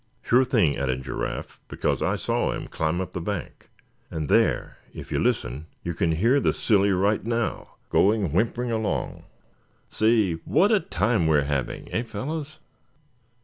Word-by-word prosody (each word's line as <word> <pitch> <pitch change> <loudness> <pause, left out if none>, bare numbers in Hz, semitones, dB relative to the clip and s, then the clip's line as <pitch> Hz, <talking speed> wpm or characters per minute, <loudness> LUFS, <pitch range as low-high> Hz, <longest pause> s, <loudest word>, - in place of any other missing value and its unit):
"Sure 125 +2 +4
thing," 110 - +2
added 65 -1 -1
Giraffe; 65 - -5
"because - - -1
I - - +1
saw - - 0
him - - -5
climb 80 +2 -1
up 90 -1 -4
the 90 - -3
bank; 95 -1 -5 0.4
and 75 -2 -4
there, - - +2 0.2
if - - -9
you - - 0
listen, 65 +6 -1 0.2
you 85 - -2
can 80 0 +1
hear 115 - +3
the - - +2
silly 100 -3 +2
right 100 +2 +2
now, 115 0 -2 0.2
going 100 -5 +3
whimpering 120 +5 0
along. 110 -2 -2 0.7
Say, 110 -6 +2
what 205 +3 +3
a 215 - +5
time 110 - 0
we 80 -1 +4
are 70 - +2
having, 70 -2 -3
eh, - - +1
fellows?" 140 +7 -5
100 Hz, 160 wpm, -25 LUFS, 80-115 Hz, 0.7 s, a